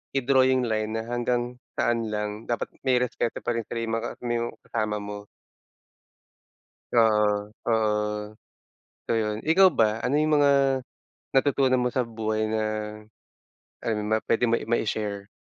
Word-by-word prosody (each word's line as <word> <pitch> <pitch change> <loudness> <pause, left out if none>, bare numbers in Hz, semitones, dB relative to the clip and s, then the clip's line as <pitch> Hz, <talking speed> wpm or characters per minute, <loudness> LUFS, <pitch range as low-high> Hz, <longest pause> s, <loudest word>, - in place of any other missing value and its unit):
i-draw 130 0 +4
yung 130 -1 +2
line 110 -1 -1
na 110 - -2
hanggang 120 +1 -2 0.2
saan 115 -1 +1
lang. 105 0 -4
Dapat 120 - -2 0.2
may 130 - +4
respeto 120 -1 -3
pa 120 - 0
rin 115 -1 -3
sila 115 -1 -3
yung 115 0 -1
mga - - -4
mo 120 -1 -2
kasama 110 -2 -2
mo. 105 0 -7 1.7
Oo, 105 -2 +3 0.2
oo. 105 -1 0 0.7
So - - -2
yun, 110 -1 -1
ikaw 185 +5 +6
ba? 110 -8 +1
Ano 140 +3 0
yung 150 -1 +3
mga, 145 -1 +5 0.8
natutunan 135 -2 +3
mo 125 - +1
sa 125 0 0
buhay 110 -1 -2
na, 110 0 -1 1.3
ano, 110 -2 0 0.3
puwede 115 - +2
mo 115 - +3
i - - -8
ma-i-share? 105 -3 -1
115 Hz, 145 wpm, -26 LUFS, 105-125 Hz, 1.7 s, ikaw